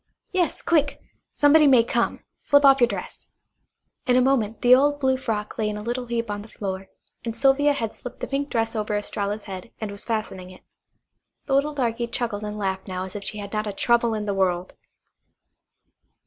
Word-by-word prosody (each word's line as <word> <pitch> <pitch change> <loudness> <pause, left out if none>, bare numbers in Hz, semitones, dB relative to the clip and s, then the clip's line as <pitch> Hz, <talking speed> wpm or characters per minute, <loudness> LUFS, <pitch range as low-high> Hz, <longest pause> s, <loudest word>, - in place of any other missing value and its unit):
"Yes, 365 -3 0
quick. 295 -4 +1 0.3
Somebody 295 +1 +5
may 255 -4 +6
come. 235 0 -1
Slip 285 0 +3
off 270 -1 +6
your 240 - +6
dress." 200 -5 -7 0.8
In 250 - +4
a - - +6
moment 250 -4 +1
the 245 +1 +7
old 290 +3 +4
blue 265 -2 +2
frock 220 -6 -4
lay 215 -1 +1
in 210 - -4
a 210 - -6
little 245 +2 -3
heap 230 -2 -2
on 205 0 -4
the 210 - -11
floor, 190 -3 -5 0.4
and 230 -1 -4
Sylvia 275 +4 +4
had 225 -6 -3
slipped 245 - -10
the - - -3
pink 280 +1 -2
dress 225 0 -1
over 210 -1 -1
Estralla's 205 0 -3
head, 190 +2 -8
and 215 -2 -4
was 200 - -7
fastening 215 -5 -3
it. 185 - -15 0.8
The 275 - -2
little 290 +2 +2
darky 235 -3 -1
chuckled 230 -3 -3
and 210 0 -5
laughed 190 -1 -3
now 185 -1 -3
as 190 +1 -8
if 205 - -5
she 210 - -4
had 200 0 -7
not 215 0 -1
a 205 - -3
trouble 235 +1 +2
in 210 -1 -3
the 200 - -1
world. 185 -2 0
225 Hz, 205 wpm, -24 LUFS, 205-265 Hz, 0.8 s, the